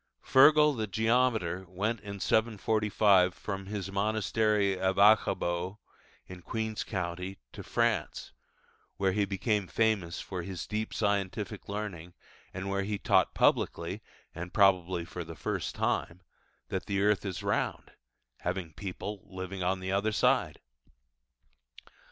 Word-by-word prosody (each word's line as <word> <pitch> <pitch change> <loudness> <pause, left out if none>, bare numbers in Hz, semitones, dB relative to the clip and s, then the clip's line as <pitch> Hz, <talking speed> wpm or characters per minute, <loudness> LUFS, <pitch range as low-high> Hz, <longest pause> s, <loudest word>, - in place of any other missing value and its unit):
'Fergil 150 +2 +6
the 110 -2 -2
Geometer' 110 -4 +1
went 105 +5 -2
in 100 -1 -7
745 105 -3 +2
from 95 -2 -5
his 100 -2 -4
monastery 105 0 +1
of 95 0 0
Aghaboe 95 -3 +3 0.5
in 90 -1 -10
Queen's 110 +3 -3
County 90 0 -4
to - - -8
France, - - -1 0.6
where 95 0 +2
he 100 +1 +1
became 100 0 -1
famous 100 -6 0
for 90 -2 -5
his 90 -1 -6
deep 110 +1 -3
scientific 100 -1 -2
learning, 95 -5 -5 0.4
and 95 +1 -5
where 100 0 0
he 105 +1 -2
taught - - +2
publicly - - +1 0.3
and 85 +1 -7
probably 90 -3 +3
for 90 +1 -6
the 80 0 -9
first - - -3
time 90 +2 -1 0.5
that - - -3
the 100 0 0
earth 105 0 +2
is 95 -3 -4
round, - - -1 0.5
having 90 -2 -3
people 100 +2 -6
living 95 0 -6
on 95 +1 0
the 95 0 -3
other 100 +3 +1
side. - - +2
100 Hz, 130 wpm, -30 LUFS, 90-105 Hz, 0.6 s, Fergil